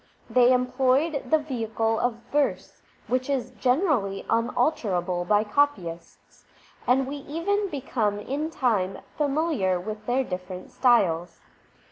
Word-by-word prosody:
They 250 0 +5
employed 265 +4 +1
the 315 - +5
vehicle 225 -6 -1
of 245 -1 0 0.2
verse, 290 -1 -1 0.2
which 255 +2 -1
is 255 -3 -1
generally 250 - 0
unalterable 215 - 0
by 210 +3 +3
copyists, 210 -9 -2 0.4
and 260 +2 +3
we 280 +2 -5
even 365 +8 -1
become 245 - -1
in 285 +8 -3
time 215 - 0 0.2
familiar 285 - +1
with 215 +3 -7
their 255 +2 +2
different 180 -3 -7
styles. 180 -9 +2
250 Hz, 115 wpm, -26 LUFS, 205-285 Hz, 0.4 s, They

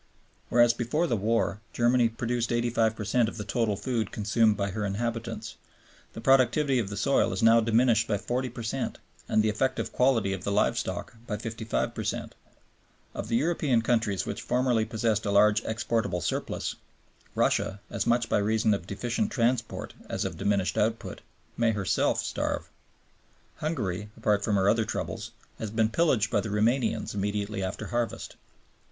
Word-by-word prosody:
Whereas 120 -1 +5
before 120 +8 0
the 135 - 0
war 110 -1 0
Germany 120 0 +3
produced 120 +1 -2
85 115 -2 +1
per 110 - -5
cent 115 +1 +2
of - - -10
the 105 - -4
total 110 -2 0
food 115 0 -2
consumed 110 0 +2
by 100 -1 -1
her 105 +2 -3
inhabitants, 115 +3 -3 0.6
the - - -7
productivity 135 +1 +3
of 105 -5 -2
the 105 - -5
soil 140 - +2
is - - -2
now 115 +1 +7
diminished 115 0 +3
by 105 - +1
40 125 +5 -2
per 120 0 -8
cent 110 - -3 0.3
and 110 - +3
the 110 - +2
effective 130 +5 -1
quality 120 -7 +2
of 95 -1 -5
the 100 - -1
live - - +2
stock 130 - -4
by 105 - -2
55 115 -1 -3
per - - -4
cent. - - -3 0.8
Of - - -5
the 115 - 0
European 140 -4 +2
countries 110 -5 +1
which - - -4
formerly 125 -3 +1
possessed 110 -1 0
a - - +1
large 105 +1 +4
exportable 110 -4 -1
surplus, - - -3 0.6
Russia, 95 - +1
as - - -2
much 120 0 +2
by 105 - +2
reason 110 +1 +2
of 90 -3 -3
deficient 120 - -2
transport 120 -2 -1 0.2
as - - -2
of - - -3
diminished 100 -1 0
output, 110 +2 -1 0.4
may 115 -1 +2
herself 100 -3 +1
starve. - - -3 0.9
Hungary, 105 - -3
apart 105 -1 +1
from 105 - +1
her 95 0 +2
other 110 +2 +3
troubles, - - -4 0.3
has 110 - -3
been 110 +1 +1
pillaged 120 -6 +2
by - - +2
the 110 - -5
Romanians 115 +4 +1
immediately 105 0 -2
after 95 0 -4
harvest. 120 -1 -3
115 Hz, 170 wpm, -28 LUFS, 105-120 Hz, 0.9 s, now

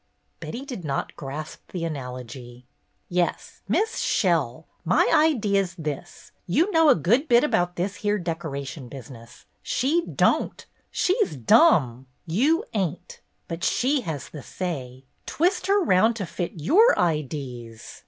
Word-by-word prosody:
Betty 240 - -6
did 250 - -7
not 140 -3 -3
grasp 150 +3 -8
the 175 -3 -2
analogy. 125 -4 -7 0.4
"Yes, 175 0 -2
Miss 445 +2 0
Shell. 160 - +1 0.2
My 180 +1 +3
idee 235 -11 +3
's 185 -1 -5
this. 155 0 -7 0.2
You 320 - +2
know 325 -3 +5
a - - +7
good 235 - +2
bit 240 -2 +5
about 180 -11 +1
this 190 +3 -2
here 210 0 0
decoration 155 -7 -5
business. 120 -3 -12 0.2
She 310 +7 +1
don't. - - +1 0.2
She 370 - +1
's 390 - -5
dumm. 130 - +4 0.2
You 285 - +2
ain't. 185 -5 -3 0.3
But 165 0 -6
she 270 +2 +1
has 155 - -5
the 150 - -9
say. 130 -7 -6 0.2
Twist 355 +5 0
her 400 +1 +4
'round 220 - +3
to 205 -4 -3
fit 175 0 -4
your 375 - +4
idees. 130 -8 -3
175 Hz, 140 wpm, -25 LUFS, -, 0.4 s, a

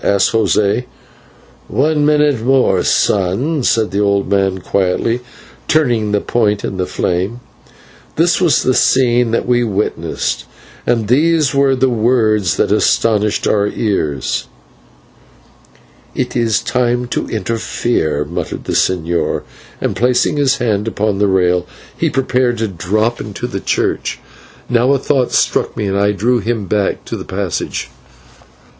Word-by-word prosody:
asked 100 -1 +2
José. 105 +1 +1 0.8
"One 145 +5 +1
minute 150 -5 +2
more, 125 -8 +3
son," 105 - +1
said 110 -5 +1
the 100 - -1
old 100 -1 +1
man, 95 -1 +1
quietly 100 +6 0 0.5
turning 120 -9 +1
the 105 - +2
point 105 -2 0
in 95 - -4
the 90 -1 -1
flame. 95 +7 -2 0.8
This 175 +3 +2
was 175 -4 +3
the 130 - +2
scene 125 -2 +3
that 115 - -1
we 120 -1 +2
witnessed, 105 -2 -2 0.4
and 115 -3 +1
these 150 +3 +2
were 140 -1 +3
the 130 +1 +2
words 110 -4 +1
that - - +1
astonished 105 -2 +1
our 100 -1 +2
ears. 80 - -2 1.7
"It 125 - -2
is 115 -4 +1
time 125 0 0
to - - -2
interfere," 110 -7 -1
muttered 85 +4 -5
the - - -4
señor, 85 -2 0 0.4
and, - - -2
placing 125 +4 +1
his 140 -1 +2
hand 110 -4 -1
upon 105 -2 -1
the 105 - +3
rail, 90 -2 +1 0.3
he - - 0
prepared 125 -2 0
to 110 0 -1
drop 105 +6 -1
into 105 +3 -6
the 115 -6 -4
church. - - -1 0.5
Now 125 +3 +2
a - - +3
thought 130 -1 0
struck - - 0
me, 105 - -1
and 95 0 -1
I 100 +1 +3
drew 120 +5 +1
him 110 -1 -2
back 100 0 -1
to - - -5
the - - -6
passage. - - -4
110 Hz, 140 wpm, -16 LUFS, 100-125 Hz, 1.7 s, more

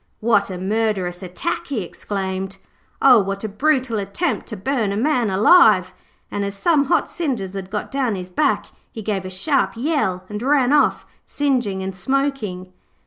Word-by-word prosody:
'What 210 -3 +2
a 185 - -5
murderous 190 -2 -1
attack!' 180 -1 -4
he 250 -9 -2
exclaimed. 190 +1 -4 0.5
'O, 255 -4 +8
what 195 0 -3
a - - -1
brutal 255 +1 0
attempt 200 - -2
to 220 - -6
burn 220 0 -1
a 200 - -2
man 250 -2 +1
alive!' 215 - +5 0.4
and 205 - -2
as 200 0 -3
some 290 - +2
hot - - +2
cinders 245 - -3
had 195 -1 -6
got 210 +1 -4
down 260 -6 0
his 185 -1 -7
back 285 +10 +1 0.3
he 220 - -8
gave 195 -3 -2
a - - -5
sharp 270 +10 0
yell 235 - 0
and 210 +1 -6
ran 270 0 +3
off, 295 - +3 0.2
singeing 245 -10 -1
and 190 0 -5
smoking. 215 -7 -2
210 Hz, 170 wpm, -21 LUFS, 190-270 Hz, 0.5 s, O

